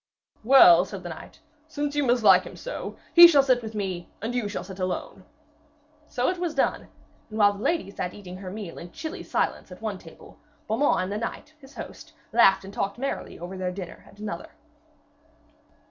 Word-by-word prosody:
'Well,' 215 -9 +8
said 195 0 -8
the 175 - -6
knight, 160 - -10 0.3
'since 290 -2 -3
you 290 - +2
mislike 240 -3 +5
him - - -10
so, - - -7 0.2
he 345 0 +11
shall 290 -5 +5
sit 255 -2 +2
with 220 -1 -8
me, 185 -4 -4
and 225 +3 -4
you 240 -4 -1
shall 205 - -4
sit 190 0 -10
alone.' 185 +1 -4 0.8
So 250 0 -1
it 365 -1 -1
was 345 -3 -2
done, 275 - 0 0.4
and 215 - -7
while 205 -1 +5
the 200 - -10
lady 325 -6 -1
sat 180 -2 -5
eating 185 -3 -9
her 185 -1 -8
meal 195 -3 -7
in 170 0 -10
chilly 325 +5 -6
silence - - -2
at - - -10
one - - -4
table, - - -15 0.3
Beaumains 225 0 +2
and 185 - -4
the 205 - -2
knight, 265 +6 -6
his 270 0 -16
host, - - -10 0.2
laughed 195 -4 +5
and 195 - -10
talked 200 +2 -2
merrily 275 +2 -4
over 175 +3 -7
their 185 -1 -3
dinner 180 -1 -8
at - - -18
another. 205 -5 -6
210 Hz, 195 wpm, -26 LUFS, 190-270 Hz, 0.8 s, he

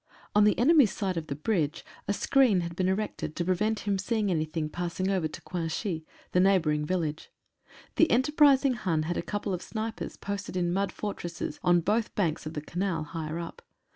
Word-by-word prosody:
On 210 0 +5
the 210 - +3
enemy's 275 - +5
side 195 -3 -2
of 165 -2 -4
the 140 - -3
bridge 160 -1 -1 0.2
a 200 - +1
screen 240 -4 +3
had 170 0 -5
been 185 +1 +1
erected 190 -5 -2
to 175 - -1
prevent 210 +4 +1
him 200 -2 0
seeing 210 -1 0
anything 155 -1 -1
passing 175 +4 -2
over 185 -5 +1
to 155 - -10
Cuinchy, 165 0 -3 0.3
the 180 - +3
neigh 195 +1 +5
bouring 150 -3 0
village. 160 -4 -2 0.7
The 325 - +5
enterprising 275 +1 +4
Hun 170 -9 0
had 175 +3 -2
a - - 0
couple 205 -1 -3
of 180 - -3
snipers 220 0 -5
posted 200 -2 -4
in 175 -1 +1
mud 195 0 0
fortresses 175 -5 -5
on 175 -1 +4
both 215 +6 0
banks 165 -6 0
of 155 - -7
the 150 - -2
Canal, 175 +1 -2
higher 155 +1 -5
up. 170 0 -7
185 Hz, 195 wpm, -28 LUFS, 165-210 Hz, 0.7 s, On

